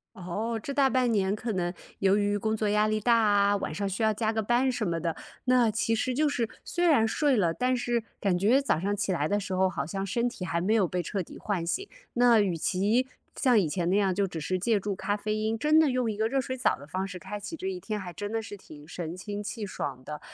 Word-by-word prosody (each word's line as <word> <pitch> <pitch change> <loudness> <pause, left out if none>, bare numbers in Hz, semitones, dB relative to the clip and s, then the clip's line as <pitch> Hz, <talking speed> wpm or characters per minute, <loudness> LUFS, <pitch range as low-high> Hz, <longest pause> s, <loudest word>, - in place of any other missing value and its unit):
哦， 215 +6 -3
这 280 - -5
大 270 -1 +4
半 255 -2 +2
年 200 -2 +1
可 225 +1 -4
能 175 -2 -1 0.3
由 195 +1 +4
于 205 0 +1
工 220 +1 0
作 215 -1 0
压 210 +1 +3
力 215 0 0
大 235 +2 +4
啊， 205 -2 +4
晚 155 - -4
上 200 +4 -2
需 195 +4 -3
要 220 - +4
加 220 +1 -1
个 220 - 0
班 240 +4 +2
什 240 -3 -2
么 165 -1 -1
的， 165 -1 -2 0.3
那 250 -2 +4
其 220 +1 0
实 250 +3 0
就 300 +4 +2
是 240 -6 -1
虽 350 0 -1
然 280 -10 +5
睡 275 +2 +2
了， 170 -4 +2
但 255 +5 +1
是 240 -1 -1 0.2
感 190 -3 +1
觉 225 +9 +4
早 270 - +1
上 200 +3 -1
起 205 -1 -1
来 155 -4 0
的 205 +3 +1
时 195 -2 -5
候 190 0 +3
好 185 - -3
像 195 +4 -3
身 235 +5 0
体 225 -6 -6
还 170 -1 -1
没 200 +6 +1
有 200 -6 +3
被 180 0 -2
彻 195 +4 -2
底 175 - -9
唤 185 -5 -2
醒。 390 - -2 0.3
那 240 -2 +5
与 190 -5 +1
其 205 +10 +1 0.3
像 245 -5 +4
以 170 - +1
前 175 +2 -1
那 195 - +3
样， 195 -3 +2
就 200 - +2
只 170 -4 -5
是 185 +5 -1
借 210 +2 +1
助 200 0 -3
咖 205 +2 -1
啡 215 +1 -2
因， 215 +1 0
真 305 +2 +4
的 305 -4 +4
用 250 -3 0
一 205 - -6
个 220 +1 +1
热 270 +3 +1
水 260 +1 -4
澡 250 - +2
的 145 - -12
方 185 +4 -3
式 180 -1 -7
开 200 +3 -6
启 205 +11 -6
这 365 +4 -5
一 375 -1 -3
天 215 -9 -4
还 185 -3 -6
真 205 +4 -5
的 225 - -1
是 205 -1 -8
挺 150 -5 -14
神 170 -1 -5
清 205 +3 -5
气 210 0 -5
爽 135 -8 -5
的， 150 +2 -6
210 Hz, 290 characters per minute, -28 LUFS, 185-235 Hz, 0.3 s, 然